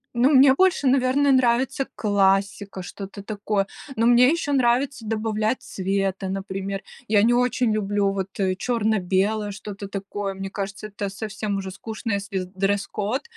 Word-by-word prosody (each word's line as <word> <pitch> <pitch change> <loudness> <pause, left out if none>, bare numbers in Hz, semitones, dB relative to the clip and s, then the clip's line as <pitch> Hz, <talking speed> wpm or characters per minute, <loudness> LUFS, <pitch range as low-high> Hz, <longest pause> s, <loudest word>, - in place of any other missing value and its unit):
Ну, 245 +3 +4
мне 265 -1 +7
больше, 360 -3 +3
наверно, 270 +2 +3
нравится 260 +1 +2
классика, 195 -1 +1
что-то 195 +2 -8
такое. 205 -1 -1 0.3
Но 230 - +1
мне 245 +1 +6
еще 315 -2 0
нравится 255 -1 +1
добавлять 220 +1 -1
цвета, 195 0 -2
например. 195 +1 -4 0.3
Я 205 -1 +4
не 240 +1 +4
очень 245 -1 +2
люблю 205 -1 +1
вот, 195 -1 -2
э, 185 -1 +1
черно-белое, 210 -2 0
что-то 200 0 -7
такое. 195 0 -4
Мне 195 0 -6
кажется, 195 +1 -5
это 200 -1 -4
совсем 205 0 -4
уже 190 -1 -5
скучно, 220 +3 -5
если 200 -1 -2
дресс-код 200 +5 -1
205 Hz, 145 wpm, -24 LUFS, 195-240 Hz, 0.3 s, мне